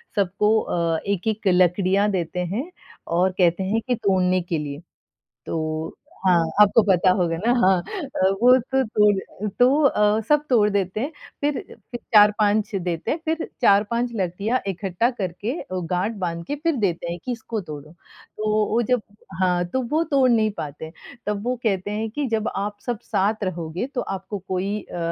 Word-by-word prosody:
सबको 210 +2 +2
अ, 165 -2 -1
1-1 205 +2 -1
लकड़ियाँ 185 +2 +3
देते 180 -2 -2 0.2
हैं 285 +9 -3 0.5
और 185 0 +3
कहते 175 +1 +3
हैं 220 +4 0
कि 250 - +2
तोड़ने 185 -4 +1
के 170 -1 -2
लिए। 145 0 -5 0.6
तो 155 0 -3 0.3
हाँ, 180 -2 +5 0.2
आपको 210 +2 +6
पता 190 -2 +3
होगा 170 -2 0
ना? 225 +8 +1
हाँ। 190 -1 +4 0.2
अ, 190 -9 0
वो 250 +1 +7
तो 265 +2 0
तोड़ 210 -3 +3 0.3
अ, - - 0
तो 270 +5 +5
अ, 210 -5 +3
सब 300 0 +3
तोड़ 215 -4 +4
देते 200 0 -1
हैं 280 +5 -2 0.3
फिर 290 -1 0
अ, - - -3 0.3
फिर 240 - -5
4-5 210 +1 +4
देते 175 -3 -2
हैं 315 - 0
फिर 320 +1 -1
4-5 235 +4 +3
लकड़ियाँ 200 +5 -1
इकट्ठा 195 +4 0
करके 200 -1 -4
अ, - - -10
गाँठ 180 +4 -1
बाँध 170 -1 -3
के 290 - -2
फिर 330 -2 +2
देते 170 -1 -2
हैं 175 - -5
कि 250 - -2
इसको 230 -2 -4
तोड़ो। 150 0 -8
तो 215 +4 -7 0.2
वो 235 +2 +2
जब 250 -2 +3 0.4
हाँ, 180 -1 +2
तो 260 +9 -2
वो 315 +2 +2
तोड़ 275 -5 +3
नहीं 220 -2 +3
पाते 150 +1 -6
हैं। 160 - -11 0.3
तब 210 -1 -2
वो 250 - 0
कहते 195 -2 0
हैं 220 +1 -2
कि 290 +5 -2
जब 220 -1 0
आप 205 +1 -3
सब 240 -3 -2
साथ 210 +1 0
रहोगे 175 +1 -3
तो 245 - 0 0.2
आपको 195 +2 -7
कोई 195 +3 -2
अ, - - -9
205 Hz, 180 wpm, -23 LUFS, 180-225 Hz, 0.6 s, वो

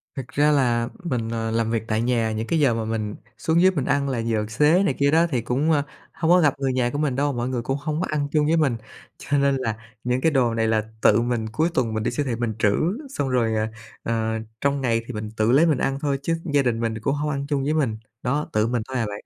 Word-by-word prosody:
Thực 130 -2 -5
ra 150 +1 +2
là 120 -4 +2
mình, 125 -8 -2
ờ, 115 -1 -2
làm 115 0 0
việc 115 -1 0
tại 110 0 0
nhà, 115 -2 +1
những 110 +1 -3
cái 165 - +1
giờ 140 -5 +4
mà 115 -1 -2
mình 110 -2 -3 0.2
xuống 165 +1 +2
dưới 190 +1 +6
mình 145 -8 -2
ăn 140 -1 +1
là 130 - -1
giờ 115 -2 0
xế 150 - +3
này 195 - +1
kia 140 0 +3
đó 165 +2 +4
thì 125 -6 0
cũng, 135 +7 0
ơ, 145 -2 +3 0.3
hông 165 +1 0
có 180 - +7
gặp 145 -4 +4
người 135 -1 0
nhà 125 -1 +1
của 145 - -4
mình 145 -4 0
đâu, 145 +1 0
mọi 120 0 -2
người 125 -2 -2
cũng 135 +4 -2
không 155 +2 -3
có - - -1
ăn 150 -2 -1
chung 150 -1 +2
với 160 +2 +2
mình. 140 -7 +2 0.4
Cho 145 - -1
nên 140 0 +3
là 115 -5 -2 0.3
những 125 +1 0
cái 160 - +3
đồ 125 -4 +2
này 115 -1 +1
là 110 -1 +2 0.2
tự 110 +2 +5
mình 120 -2 -1
cuối 160 +9 +1
tuần 115 -4 0
mình 110 0 -2
đi - - 0
siêu 145 +4 -1
thị 125 -3 -1
mình 115 -1 -2
trữ, 100 -2 +3 0.3
xong 145 - -2
rồi, 120 -3 +1
ờ, 110 0 0 0.4
ờ, 110 -1 -1 0.2
trong 140 0 +1
ngày 115 -3 +1
thì 125 - -6
mình 105 -1 -5
tự 110 +2 +2
lấy 145 +6 +5
mình 155 -5 +2
ăn 135 +1 -1
thôi 140 -2 0
chứ 165 +2 0 0.2
gia 145 - +5
đình 120 -4 0
mình 115 -1 -1
cũng 140 +5 0
hông 150 +1 -2
ăn 140 -1 -2
chung 140 -2 0
với 150 +3 0
mình. 135 -9 0 0.3
Đó, 145 +4 -1
tự 110 +1 +2
mình 120 -1 -1
thôi 130 - -3
à 115 - 0
bạn. 105 0 -7
130 Hz, 285 wpm, -23 LUFS, 115-145 Hz, 0.4 s, có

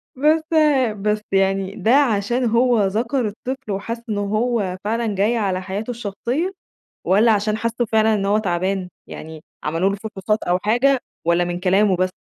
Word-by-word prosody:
بس 305 +4 +3 0.6
بس 210 +1 0
يعني 195 0 +1
ده 225 - +1
عشان 240 -2 +2
هو 235 0 +3
ذكر 230 +5 0
الطفل 250 +2 -6
وحس 230 +4 -4
إن 210 - -1
هو 205 -2 -1
فعلًا 220 0 -1
جاي 210 +5 +1
على 190 -4 -1
حياته 200 +5 -4
الشخصية، 240 - -3 0.5
والَّا 210 +5 +4
عشان 210 +1 0
حس 230 +1 -1 0.2
فعلًا 220 0 +3
إن 200 -2 0
هو 205 +2 +2
تعبان، 185 -1 -1 0.2
يعني 160 0 -9 0.2
عملوا 165 +5 +1
له 200 - -1
فحوصات 210 0 -3
أو 175 +1 +1
حاجة 245 +7 +2 0.3
والَّا 170 +1 +3
من 175 0 -3
كلامه 195 +1 +3
بس؟ 185 +1 0
210 Hz, 160 wpm, -21 LUFS, 195-230 Hz, 0.6 s, والَّا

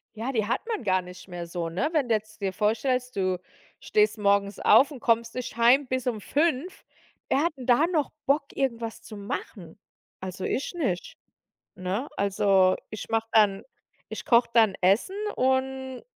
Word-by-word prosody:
Ja, 235 +5 -3
die 215 -4 0
hat 235 - 0
man 445 - -3
gar 185 -2 +2
nicht 180 +1 -12
mehr 175 -1 -6
so, 170 -1 -4
ne? 225 - -1
Wenn 285 -7 0
du 225 - +4
jetzt 215 0 -7
dir 195 -1 0
vorstellst, 250 +5 0
du 185 -2 0 0.4
stehst 425 - +2
morgens 200 0 +1
auf 280 +3 +5
und 265 - -8
kommst 230 0 +1
nicht 250 -3 -5
Heim 250 +4 +5
bis 255 0 -2
um 225 -4 -1
5. 315 - -1 0.5
Wer 280 - +2
hat 340 - 0
denn 255 0 -9
da 250 +6 +5
noch 315 -5 0
Bock, 280 +1 +2
irgendwas 235 -4 -2
zu 215 - -10
machen? 200 -3 -7 0.4
Also 185 0 -6
ich 275 - -2
nicht, 320 - -3 0.6
ne? 195 +9 -3
Also, 195 -1 +3
ich 215 - -7
mache 225 0 -1
dann 205 -3 +4 0.5
ich - - -7
koche 235 0 +4
dann 220 -4 +5
Essen 210 - +2 0.2
und 260 0 -1
230 Hz, 175 wpm, -26 LUFS, 200-265 Hz, 0.6 s, auf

